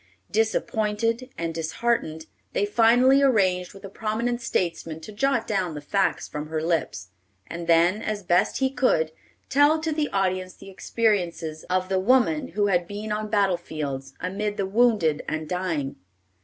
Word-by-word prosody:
Disappointed 225 +2 0
and 165 -1 -3
disheartened, 160 -1 -1 0.3
they 205 - +1
finally 245 +6 +5
arranged 190 -9 +2
with 195 +1 -11
a - - -7
prominent 230 +4 -2
statesman 165 -7 -2
to 215 - -9
jot 240 +3 0
down 185 -6 -1
the - - -4
facts 190 +7 0
from 150 +1 -6
her 155 0 -2
lips; 160 - -1 0.4
and 170 0 -7
then, 170 +5 +4
as 210 -1 -3
best 175 0 +2
he 265 -1 +1
could, 205 -12 +2 0.4
tell 290 +3 +4
to 315 +1 -2
the 300 -1 -1
audience 185 -1 -1
the 195 - -12
experiences 180 -7 -1
of 185 0 0
the 190 0 +1
woman 195 -7 +3
who 205 - +3
had 175 -3 +1
been 210 +2 -5
on 215 0 -2
battle 200 -4 +2
fields, 140 -5 -6
amid 205 +3 -3
the 195 - 0
wounded 200 -7 +2
and 155 0 -3
dying. 165 -6 -2
195 Hz, 160 wpm, -25 LUFS, 170-225 Hz, 0.4 s, finally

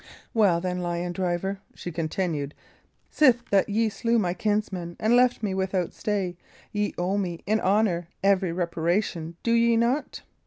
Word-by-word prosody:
"Well, 200 -7 +4
then, 180 0 -2
lion 175 0 -2
driver," 190 +1 -2 0.2
she 175 - -6
continued, 160 -3 -2 0.6
"sith 250 -5 +4
that 200 0 +3
ye 220 +2 +2
slew 230 +3 0
my 180 -5 +1
kinsman, 190 -4 -2
and 220 +3 +3
left 250 -2 +3
me 200 -3 0
without 190 -2 -1
stay, 195 -4 -2 0.3
ye 210 0 -1
owe 185 +3 0
me, 175 -4 -4
in 215 +2 +2
honour, 190 -4 +1 0.2
every 195 -2 +3
reparation; 170 0 -1
do 230 - +1
ye 235 0 +4
not?" 245 +6 0
190 Hz, 155 wpm, -26 LUFS, 175-215 Hz, 0.6 s, Well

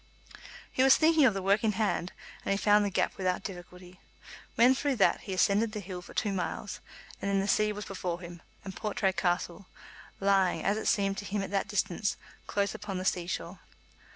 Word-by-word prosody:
He - - +1
was 265 0 +7
thinking 315 -2 +5
of 220 -6 +3
the 195 - -3
work 200 +3 +3
in 215 -1 +2
hand, 200 -4 -1 0.3
and - - -4
he 195 - +2
found 210 +1 +4
the 205 - 0
gap 190 - 0
without 185 0 -1
difficulty. 180 -1 -10 0.6
When 245 +2 +6
through 275 +1 -1
that 205 - +3
he 195 - -5
ascended 205 +4 +2
the 215 - -3
hill 185 -2 -7
for 180 - -14
two 205 -2 0
miles, 185 -2 -4 0.4
and 200 - -2
then 200 0 +2
the 195 - -1
sea 210 +1 +2
was 210 0 -6
before 180 -3 -4
him, 175 -1 -10 0.2
and 190 -1 -7
Portray 200 -3 -1
Castle, 175 +1 -1 0.5
lying, 195 -2 +2
as 200 - +2
it 220 - -3
seemed 195 -2 +1
to 205 - -7
him 200 0 -2
at 195 - -6
that 200 -1 0
distance, 195 -1 -1 0.3
close 200 0 0
upon 195 -2 -5
the 185 - -4
sea 175 -2 0
shore. 175 +1 -5
195 Hz, 210 wpm, -29 LUFS, 185-210 Hz, 0.6 s, was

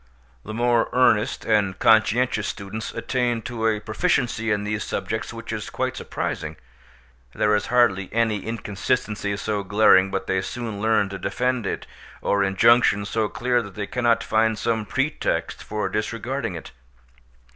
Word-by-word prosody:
The 110 - -7
more 120 0 +2
earnest 120 -1 +2
and 100 -4 +1
conscientious 110 0 +3
students 105 +2 -5
attain 120 -3 -1
to 115 -1 -2
a 110 -1 +1
proficiency 115 -1 0
in 105 -1 0
these 105 -1 -2
subjects - - -3
which - - -7
is - - -4
quite - - -2
surprising; - - -4 0.8
there 105 - +2
is 105 - -1
hardly 100 -6 +2
any 110 -3 0
inconsistency 105 -1 -2
so 105 0 -2
glaring 95 -1 +5
but 95 0 -3
they 95 -1 0
soon 115 -2 -5
learn 110 -2 +2
to 95 -1 -6
defend 125 0 -1
it, - - -3 0.3
or 100 0 +1
injunction 100 +1 +4
so 110 0 -1
clear 125 0 0
that 100 -4 -10
they 105 - -3
cannot 120 0 +1
find 110 0 +2
some 110 -1 -1
pretext 135 +3 -1
for 105 0 -2
disregarding 115 0 -3
it. 80 - -9
110 Hz, 150 wpm, -23 LUFS, 100-120 Hz, 0.8 s, glaring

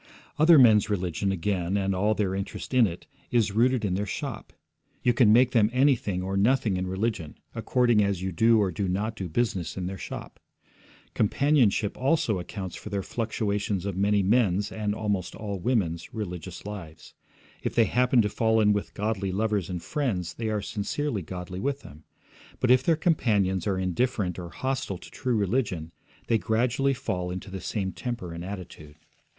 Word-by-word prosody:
Other 160 +1 +7
men's 110 -6 +6
religion, 95 -1 -1
again, 95 0 -1
and 95 -1 0
all 105 +3 +1
their 100 -3 0
interest 100 +6 -5
in 125 -3 +5
it, 85 -1 -8 0.2
is 115 -4 +2
rooted 120 +2 +2
in 95 - 0
their 100 +2 -1
shop; - - -5 0.5
you 120 - +4
can 115 -3 +5
make 125 +3 +5
them 110 -4 +4
anything 125 -8 +2
or 95 +1 -3
nothing 110 0 +2
in 90 0 -2
religion, 95 -5 -2 0.2
according 120 -4 +2
as 100 -2 0
you 95 +1 -3
do 115 +6 +4
or 100 -3 +1
do 95 +4 -2
not 105 +5 -1
do 95 -4 -5
business 95 -2 -1
in 90 - -3
their 95 +1 -5
shop. - - -8 0.7
Companionship, 115 -3 +2
also, 130 - +1
accounts 95 0 -6
for - - -8
the 100 -2 -2
fluctuations 105 -4 -2
of 100 -3 -3
many 100 +1 +2
men's, 100 -1 +2
and 105 -1 -2
almost 100 -4 -2
all 100 -3 -5
women's, 90 -6 -1
religious 90 -4 -6
lives. 85 -7 -9 0.5
If - - -3
they 115 - +5
happen 125 0 +3
to - - +1
fall 110 +1 +2
in 105 -1 +4
with 105 - -3
godly 100 -2 -1
lovers 105 -2 0
and 90 -2 -4
friends, 100 - -2
they 110 +4 -3
are 105 -2 -1
sincerely 110 +3 -2
godly 90 +2 -6
with 140 +6 -2
them; 75 +2 -14 0.5
but 125 - +2
if 130 0 +6
their 165 +4 +3
companions 105 - +1
are 95 -2 +1
indifferent 95 0 -1
or 85 -1 -6
hostile 130 -5 -3
to - - -13
true 125 -3 -1
religion, 100 -6 -1 0.3
they 115 - +2
gradually 125 +5 +1
fall 100 -9 -3
into 95 +2 -6
the 95 -1 -6
same 95 -3 -2
temper 115 -9 -5
and 85 +1 -6
attitude. 90 -6 -8
105 Hz, 180 wpm, -27 LUFS, 95-115 Hz, 0.7 s, Other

